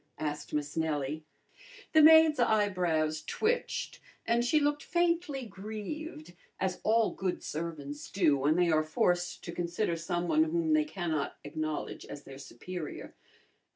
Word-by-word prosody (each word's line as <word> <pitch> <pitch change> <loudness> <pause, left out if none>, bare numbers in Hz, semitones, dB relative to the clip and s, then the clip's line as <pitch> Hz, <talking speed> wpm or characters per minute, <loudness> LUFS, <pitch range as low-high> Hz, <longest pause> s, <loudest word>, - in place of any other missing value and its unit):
asked 150 -1 -4
Miss 145 -1 -2
Nellie. 155 -1 -2 0.7
The 315 - +7
maid's 320 -1 +7
eyebrows 180 -9 +1
twitched, 470 +2 -2 0.3
and 235 +1 +2
she 275 +6 +3
looked 290 0 +1
faintly 340 -6 0
grieved, 210 - -7 0.3
as 185 -1 -2
all 225 0 +3
good 185 -2 -3
servants 150 -3 -5
do 170 -7 +3
when 145 +3 +2
they 175 -1 +3
are 155 0 +4
forced 175 +3 0
to 170 - -5
consider 175 +2 -1
someone 175 - +1
whom 325 -1 +1
they 310 0 +3
cannot 170 - -3
acknowledge 155 +1 -4
as 145 - -8
their 135 0 -11
superior. 160 +5 -7
175 Hz, 135 wpm, -30 LUFS, -, 0.7 s, The